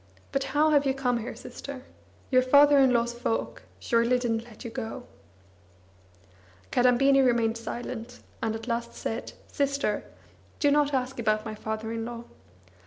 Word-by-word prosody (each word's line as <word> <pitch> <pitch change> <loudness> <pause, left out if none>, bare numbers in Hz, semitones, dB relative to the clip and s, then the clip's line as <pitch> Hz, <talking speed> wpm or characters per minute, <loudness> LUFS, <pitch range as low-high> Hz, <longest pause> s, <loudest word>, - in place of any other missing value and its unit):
But 275 0 0
how 310 +1 +5
hate 285 -2 +4
you 265 - +1
come 250 -3 0
here, 230 - -6
sister? 275 -2 -9 0.5
Your 255 -1 +6
father 285 +2 +6
in 265 -2 +5
law's 235 0 +1
folk 235 -1 -2 0.2
surely 235 +1 +2
didn't 230 -2 -1
let 235 -1 -13
you 235 - -5
go!" 245 +1 -5 1.7
Kadambini 270 +3 +4
remained 235 -3 +2
silent, 240 +1 -6 0.2
and 220 -1 -1
at 225 +1 -7
last 235 0 -3
said: 225 +2 -4
"Sister, 280 0 -1 0.6
do 290 -2 +3
not 290 -1 +3
ask 255 0 -2
about 215 -1 +1
my 220 - -4
father 220 +1 -4
in 230 0 -3
law. 235 0 -6
245 Hz, 155 wpm, -27 LUFS, 230-270 Hz, 1.7 s, Your